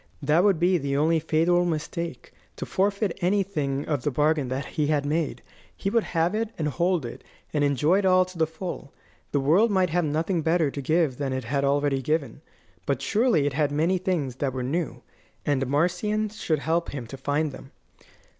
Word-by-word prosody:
That 150 +4 +3
would 200 -4 +4
be 180 +1 +3
the 140 -1 -1
only 160 +3 +3
fatal 165 +3 +2
mistake: 165 -2 -4 0.2
to - - -5
forfeit 200 0 0
anything 175 -8 0
of 145 -5 -1
the 145 - 0
bargain 150 0 +1
that 130 +2 -3
he 150 -2 -1
had 145 -1 +1
made. 155 +1 -1 0.3
He 195 - -2
would 230 -1 +2
have 165 +2 0
it, 220 0 -1
and 155 - -1
hold 170 -1 0
it, 120 - -8 0.3
and 150 -2 +1
enjoy 145 +6 +3
it 200 - -1
all 185 0 +5
to 185 0 -13
the 160 - +3
full. 160 -3 -7 0.4
The 145 - +1
world 170 +12 +4
might 185 -4 +2
have 175 +1 +2
nothing 160 +4 0
better 160 -2 +2
to 140 - -5
give 155 -2 +1
than 135 -2 -2
it 130 0 -3
had 140 +4 -1
already 140 -1 +1
given; 150 0 -2 0.5
but 140 -3 +1
surely 205 - +2
it 145 - 0
had 145 0 +1
many 165 +6 +1
things 165 - -2
that 135 -2 -1
were 130 -1 -3
new, 150 +3 -3 0.4
and 135 -2 +1
Marcion 180 +9 0
should 170 -6 -1
help 165 +3 -1
him 130 -4 -5
to 120 - -8
find 145 +3 -1
them. 135 - -11
155 Hz, 200 wpm, -25 LUFS, 140-180 Hz, 0.5 s, all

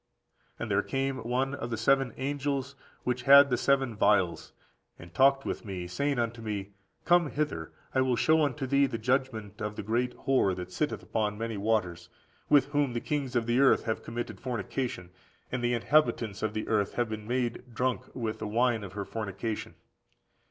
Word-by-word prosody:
] - - -40
"And - - -4
there - - +3
came 135 0 -2
one 130 +3 -1
of 130 -4 -4
the 115 - -2
seven 135 -2 +3
angels 140 0 -2 0.3
which 125 0 -1
had 140 0 +9
the - - +4
seven 135 -2 +1
vials, 95 -4 +2 0.5
and 85 0 -13
talked 135 +6 +4
with - - -3
me, 95 -5 -5
saying 140 +10 -1
unto 115 -1 -2
me, 105 -3 -4 0.3
Come 175 -3 +4
hither; 140 - -3 0.2
I 130 - +3
will 130 -1 +2
show 160 +6 +3
unto 140 -1 -1
thee 140 +1 +3
the 120 -3 -4
judgment 115 -4 -1
of 105 0 -3
the - - -5
great 120 +4 -1
whore 130 -8 +2
that 90 0 -7
sitteth 90 - -2
upon 105 -2 -1
many 115 0 -3
waters; 100 -5 -1 0.4
with 145 -3 +6
whom 145 -3 +1
the 120 - -1
kings 135 -2 -3
of 120 -1 +2
the 120 +2 +2
earth 135 -1 +5
have 110 -2 -2
committed 115 -3 -5
fornication, 120 -5 -4 0.4
and 125 -1 -2
the 120 0 +2
inhabitants 115 -5 +1
of 110 0 -2
the 110 - -3
earth 105 -3 +1
have 120 -1 +1
been 110 -1 -6
made 120 -1 -1
drunk 125 +2 0
with 115 -3 -3
the 110 - -4
wine 115 0 +1
of 95 -2 -8
her 100 -1 -4
fornication. 105 +1 -4
120 Hz, 190 wpm, -29 LUFS, 105-135 Hz, 0.5 s, had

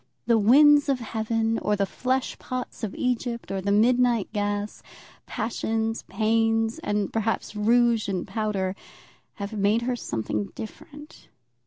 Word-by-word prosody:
The 230 -2 +4
winds 290 +7 +6
of 270 -2 +1
heaven, 225 0 -1
or 210 - 0
the 200 -1 +1
flesh 255 +5 -2
pots 255 -1 -6
of 210 - -3
Egypt, 245 -2 -2
or 195 -1 -2
the 200 +2 -1
midnight 235 0 +3
gas, 205 0 -2 0.5
passions, 225 0 -2
pains, 225 +4 +1
and, 205 - -2
perhaps, 225 -1 -1
rouge 230 0 +3
and 185 -1 -2
powder, 195 -2 -2 0.6
have 200 +1 -6
made 210 +2 +1
her 250 +1 0
something 110 - -3
different. 295 +6 -11
225 Hz, 135 wpm, -25 LUFS, 205-240 Hz, 0.6 s, winds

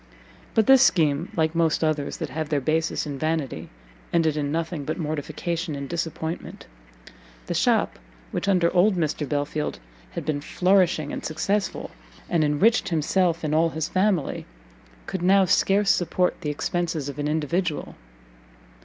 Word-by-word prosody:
But 220 -2 +4
this 265 +1 +7
scheme, 160 - +3
like 160 -1 +1
most 165 -1 +1
others 155 -2 -1
that - - -5
have 155 -1 -3
their 150 -2 +1
basis 160 +5 0
in 140 -2 -5
vanity, 150 - -2 0.4
ended 160 -3 +2
in 145 -1 -1
nothing 165 -1 -2
but 155 +3 -3
mortification 160 +1 -3
and 140 0 -5
disappointment: 165 0 -4 0.8
the - - -3
shop - - +1 0.3
which - - -3
under 180 -4 +3
old 190 +3 +4
Mr. 155 -3 -1
Belfield 150 +1 -2 0.4
had - - -5
been 150 -2 -1
flourishing 180 -3 +2
and - - -5
successful, 195 +6 -2 0.4
and 170 -3 +3
enriched 180 +12 +3
himself 170 +1 +1
and 155 -1 -1
all 165 +2 +3
his 160 0 -3
family, 185 -6 0 0.6
could 190 -2 -4
now 190 +2 +5
scarce 195 +2 +3
support 180 +1 0
the 150 - -2
expences 165 0 -2
of 140 0 -6
an 145 - -1
individual. 160 +2 -1
160 Hz, 150 wpm, -24 LUFS, 150-180 Hz, 0.8 s, this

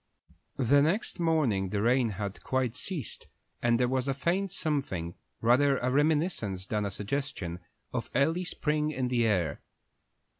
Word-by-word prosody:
The 140 +2 +4
next 175 +7 0
morning 140 - +2
the 100 +1 -1
rain 120 0 +3
had 100 -2 -4
quite 130 -3 0
ceased, 145 - -5 0.3
and 120 -1 +3
there 125 - +3
was 130 +1 0
a 135 - 0
faint 175 +7 0
something, 135 - -2 0.3
rather 135 +4 +4
a 125 +1 0
reminiscence 145 - +1
than 105 0 -1
a - - -1
suggestion, 100 -4 -3 0.3
of - - -3
early 160 +7 +2
spring 150 -4 0
in 130 -4 -1
the 120 -2 +2
air. 85 -9 0
130 Hz, 150 wpm, -29 LUFS, 105-150 Hz, 0.3 s, The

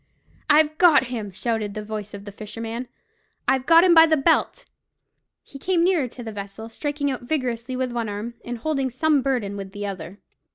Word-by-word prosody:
"I've 305 0 +5
got 310 -8 +5
him!" 210 -4 -4
shouted 215 0 -2
the 215 - -4
voice 210 -1 -6
of 200 0 -10
the 205 - -7
fisherman. 225 +4 -6 0.6
"I've 265 -1 +1
got 335 +1 +7
him 365 -2 +6
by 325 0 +8
the 315 -1 +3
belt!" 330 - +1 0.8
He 275 - -12
came 355 +2 +1
nearer 345 -7 +2
to 245 +1 -10
the 225 - -6
vessel, 205 +2 -7
striking 285 +3 -2
out 260 - -4
vigorously 245 -2 -2
with 255 -1 -2
one 235 -2 -2
arm, 210 +3 -5
and 240 0 -5
holding 275 0 -1
some 290 +3 +2
burden 245 -7 -1
with 195 -1 -7
the 205 0 -5
other. 195 -1 -6
245 Hz, 195 wpm, -23 LUFS, 210-295 Hz, 0.8 s, by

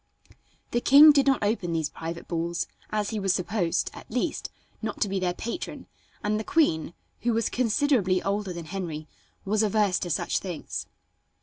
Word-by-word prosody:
The 240 - +1
king 295 +4 +9
did 280 -2 +3
not 270 -5 +3
open 205 -5 0
these 160 -2 -1
private 165 +1 -6
balls, 170 0 -1 0.2
as 210 0 -1
he 220 - -2
was 195 -2 +2
supposed, 180 -2 0
at - - -12
least, 250 +7 -2 0.3
not 215 -2 -4
to - - +3
be 195 0 -1
their 180 -1 -1
patron, 235 +9 -5 0.4
and 215 +1 +1
the - - -3
queen, 170 - +1 0.2
who 240 0 0
was 230 0 +1
considerably 240 -6 +2
older 200 -1 -1
than 170 -2 -6
Henry, 160 -4 -5 0.4
was 210 +2 +2
averse 210 -3 +2
to 175 - -4
such 155 - 0
things. 175 -5 -5
200 Hz, 175 wpm, -27 LUFS, 175-230 Hz, 0.4 s, king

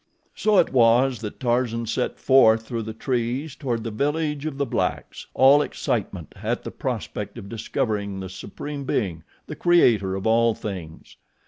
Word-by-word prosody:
So 215 -2 +2
it 170 - +3
was 125 +1 +4
that 105 -2 -7
Tarzan 120 -2 0
set 125 +3 -2
forth 115 -4 +5
through 115 0 -3
the 110 0 -5
trees 125 +4 -2
toward 120 -5 -3
the 115 - -4
village 150 +4 -1
of 145 -3 -5
the 140 - 0
blacks, - - -3
all 135 +3 +6
excitement - - -3
at - - -2
the - - -6
prospect 105 -1 -5
of 100 - -8
discovering 105 -4 -2
the 95 - -5
Supreme 140 +10 -7
Being, 95 -11 -2 0.2
the - - -7
Creator 115 - +3
of 95 - -5
all 115 0 +3
things. 90 -6 -8
115 Hz, 160 wpm, -24 LUFS, 105-135 Hz, 0.2 s, all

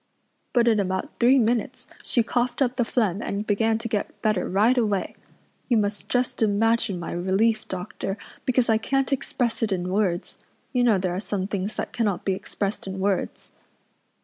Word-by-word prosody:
But 240 -2 +3
in 220 -2 +4
about 190 -1 -2
three 250 +3 +6
minutes 245 +2 0 0.2
she 240 - +3
coughed 240 +1 -1
up 250 -1 -1
the 245 - +2
phlegm 215 -5 0
and 205 -2 -3
began 220 +2 +2
to 230 +1 -4
get 215 -3 -3
better 210 -4 +1
right 210 +7 +4
away. 210 -6 0 0.5
You 240 - +4
must 205 -1 -1
just 245 -1 0
imagine 220 -1 +2
my 170 - -5
relief, 195 +5 +1
doctor, 190 +2 -4 0.3
because 255 -1 +2
I 220 -1 +3
can't 270 +3 0
express 245 -3 -1
it 220 -2 0
in 180 -1 -1
words. 185 -3 -1 0.3
You 250 -1 +3
know 230 -5 +4
there 185 -1 -1
are 180 - -2
some 200 -2 -2
things 200 +1 -3
that - - -4
cannot 205 -6 -1
be 195 - +2
expressed 195 +1 -4
in 190 0 -4
words." 195 0 -2
215 Hz, 180 wpm, -25 LUFS, 195-235 Hz, 0.5 s, three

